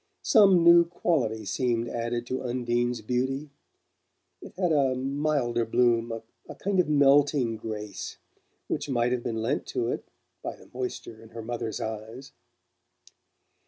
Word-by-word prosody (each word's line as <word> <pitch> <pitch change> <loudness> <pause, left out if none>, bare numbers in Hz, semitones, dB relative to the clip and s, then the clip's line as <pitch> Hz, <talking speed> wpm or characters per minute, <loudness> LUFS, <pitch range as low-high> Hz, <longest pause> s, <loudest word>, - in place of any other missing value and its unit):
Some 195 -7 +6
new 170 0 +8
quality 130 -11 -1
seemed 120 +2 0
added 120 0 -3
to 130 +1 -3
Undine's 120 -1 -1
beauty: 130 +5 -2 0.9
it - - -10
had 180 -3 +1
a 135 -4 +3
milder 135 -3 0
bloom, 115 0 +2 0.4
a - - -7
kind 195 -1 -1
of 175 - +2
melting 140 -4 +4
grace, 105 -2 -6 0.5
which 145 - -3
might 120 -2 +1
have 125 -1 0
been 115 -2 -3
lent 135 +6 -1
to 120 -2 -1
it - - -4 0.3
by - - -5
the - - -18
moisture 125 -3 -5
in 115 - -14
her 115 0 -8
mother's 115 -2 -4
eyes. 110 +5 -6
125 Hz, 140 wpm, -27 LUFS, 115-140 Hz, 0.9 s, new